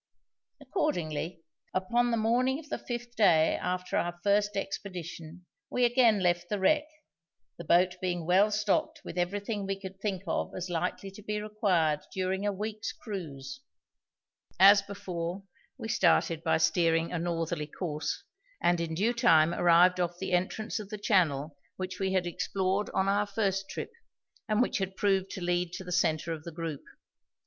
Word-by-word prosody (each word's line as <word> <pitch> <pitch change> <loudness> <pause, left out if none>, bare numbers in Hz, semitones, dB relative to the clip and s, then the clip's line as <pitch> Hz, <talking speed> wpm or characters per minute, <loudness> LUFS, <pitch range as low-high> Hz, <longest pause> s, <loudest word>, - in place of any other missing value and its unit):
Accordingly, 165 - -2 0.3
upon 240 +6 +1
the 230 - +1
morning 245 +4 +2
of 300 -1 -11
the - - -3
fifth 240 0 -6
day 170 -7 +4
after 180 0 -2
our 175 0 -2
first 205 0 +2
expedition 180 -3 -6 0.2
we 250 - +2
again 235 -4 +4
left 175 -1 +1
the 210 - 0
wreck, 300 +10 +2 0.7
the - - -5
boat 180 +2 +3
being 175 -3 -2
well 190 +5 +4
stocked 210 -1 0
with - - -7
everything 200 +3 -2
we 195 0 -2
could 190 -1 -9
think 195 -3 -2
of - - -2
as 180 0 -4
likely 180 +3 -2
to 195 - -12
be 210 0 -3
required 190 -8 +1
during 190 +2 -1
a - - +2
week's 215 +2 -4
cruise. 140 - -7 1.0
As 200 +2 +8
before, 185 -2 -5 0.3
we - - -6
started 165 -5 +2
by 160 -1 +3
steering 165 0 +2
a 175 - -2
northerly 165 -2 -2
course, 155 -2 -4 0.4
and 175 -1 +2
in 160 -1 -3
due 215 +8 +1
time 165 -9 +4
arrived 175 +2 +5
off 175 -1 -1
the 190 +1 -4
entrance 210 +6 -1
of 205 -2 -8
the 210 - -5
channel 160 -8 +1 0.2
which 185 0 -5
we 190 -1 0
had 185 -2 +1
explored 190 +3 -1
on 190 - 0
our 205 +1 +2
first 195 -2 -1
trip, - - -5 0.6
and 215 +3 +3
which 250 - -1
had 190 0 -3
proved 195 -2 +1
to 185 - -6
lead 175 0 0
to 190 0 -5
the 180 - -8
centre 165 -2 +1
of 155 -1 -7
the 170 - -7
group. 160 -3 -5
185 Hz, 170 wpm, -29 LUFS, 170-205 Hz, 1.0 s, As